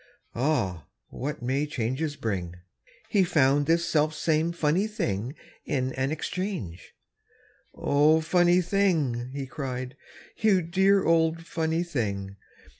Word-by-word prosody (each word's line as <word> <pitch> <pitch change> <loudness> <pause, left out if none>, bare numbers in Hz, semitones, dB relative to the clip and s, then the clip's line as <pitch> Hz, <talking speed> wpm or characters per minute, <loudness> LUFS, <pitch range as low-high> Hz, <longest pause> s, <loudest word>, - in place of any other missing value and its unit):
(Ah! 115 - -1 0.2
what 145 -1 -5
may 135 +4 0
changes 145 +2 -2
bring!) 90 -8 -3 0.5
He 200 -4 +4
found 145 -4 +3
this 170 +1 +2
selfsame 155 +1 +1
funny 170 +4 +1
thing 130 - -3 0.3
In 130 -1 -1
an 130 +2 -1
exchange 160 - -4 0.8
"O, 150 +3 +3
funny 175 +2 +3
thing!" 160 -11 +1
He 140 0 -4
cried, 130 -2 -5 0.4
"You 200 -5 +3
dear 190 +3 +3
old 165 0 +2
funny 160 +1 -1
thing!" 100 - -3
150 Hz, 115 wpm, -27 LUFS, 130-170 Hz, 0.8 s, He